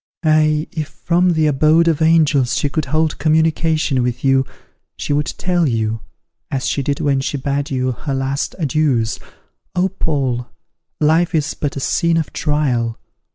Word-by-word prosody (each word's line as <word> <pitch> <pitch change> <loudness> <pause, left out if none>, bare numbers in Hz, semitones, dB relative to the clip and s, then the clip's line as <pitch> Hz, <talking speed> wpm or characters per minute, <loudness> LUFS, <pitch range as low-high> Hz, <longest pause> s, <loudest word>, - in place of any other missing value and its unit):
Ah! 155 -1 +3
if 155 -3 -4
from 175 +3 +1
the 160 -1 +2
abode 155 +3 +3
of 160 -2 +1
angels 155 -6 +3
she 145 - 0
could 155 +1 -2
hold 155 +2 0
communication 155 -2 +1
with 125 0 -2
you, 135 0 +3 0.5
she - - -2
would 145 +2 0
tell 175 -3 0
you, 110 -1 -1 0.5
as 135 -1 -2
she 140 - 0
did 140 +1 -2
when 140 -2 +1
she 140 - -2
bade 140 +1 -2
you 130 -1 -1
her 135 +3 -4
last 135 +1 -2
adieus, 140 -8 0 0.6
'O, 180 +1 +2
Paul! 135 -9 -2 0.5
life 165 +3 +2
is 155 -1 0
but 145 -2 -4
a - - -3
scene 170 +4 +1
of 160 - -2
trial. 135 -7 0
150 Hz, 160 wpm, -18 LUFS, 135-160 Hz, 0.6 s, Ah